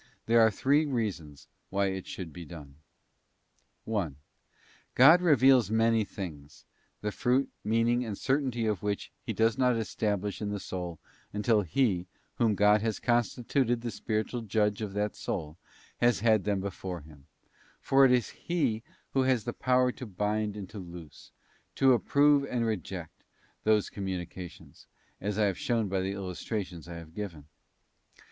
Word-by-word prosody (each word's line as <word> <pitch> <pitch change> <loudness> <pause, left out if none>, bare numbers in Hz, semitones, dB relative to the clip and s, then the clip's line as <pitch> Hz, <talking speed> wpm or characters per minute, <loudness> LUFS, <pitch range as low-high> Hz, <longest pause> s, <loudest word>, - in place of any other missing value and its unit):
There 115 0 +5
are 110 - +6
three 145 +8 +2
reasons 95 - -3 0.2
why 100 0 +1
it 95 -1 -6
should 85 -5 -7
be 85 - -8
done: 75 -3 -11 1.1
1. 100 -10 -2 0.8
God 155 +8 +8
reveals 135 - +5
many 115 0 +3
things, 75 -7 -8 0.4
the 105 - -2
fruit, 125 +5 +1
meaning, 115 +3 +2
and 110 -4 -5
certainty 130 -4 0
of 105 -5 0
which 105 -1 -3
He - - -4
does 115 +3 +1
not 125 -2 +4
establish 105 -2 -2
in 105 - -2
the 105 0 -3
soul 90 -3 -5 0.4
until 105 +1 +2
_ - - -11
he, 95 - +1 0.3
whom 115 -3 +3
God 105 +1 +4
has 110 -1 -1
constituted 120 +1 +1
the 120 -1 -3
spiritual 110 +3 -2
judge 105 -1 0
of 105 -3 -4
that 105 +1 -1
soul, 75 +2 -4 0.4
has 120 -4 +2
had 110 -4 +3
them 100 -2 0
before 95 -3 -5
him; 75 -2 -16 0.5
for 135 0 +4
it 130 - +6
is 125 -3 +2
he 140 -11 -1 0.3
who 135 - +2
has 130 -4 +2
the 120 - -4
power 125 0 +2
to 125 -1 -8
bind 105 +1 -1
and 100 -2 -6
to 105 - -7
loose, 85 -4 -11 0.4
to 135 -1 +5
approve 140 +3 +4
and 120 -3 -1
reject, 95 -5 -5 0.4
those 105 -1 +3
com 100 -2 -5
munications, 90 -1 -7 0.3
as 105 +1 -2
I 110 - +3
have 95 -3 -1
shown 115 -3 0
by 95 0 0
the 95 +1 -2
illustrations 95 -2 -5
I 85 - -7
have 80 -1 -10
given. 85 -7 -6
105 Hz, 160 wpm, -29 LUFS, 95-120 Hz, 1.1 s, God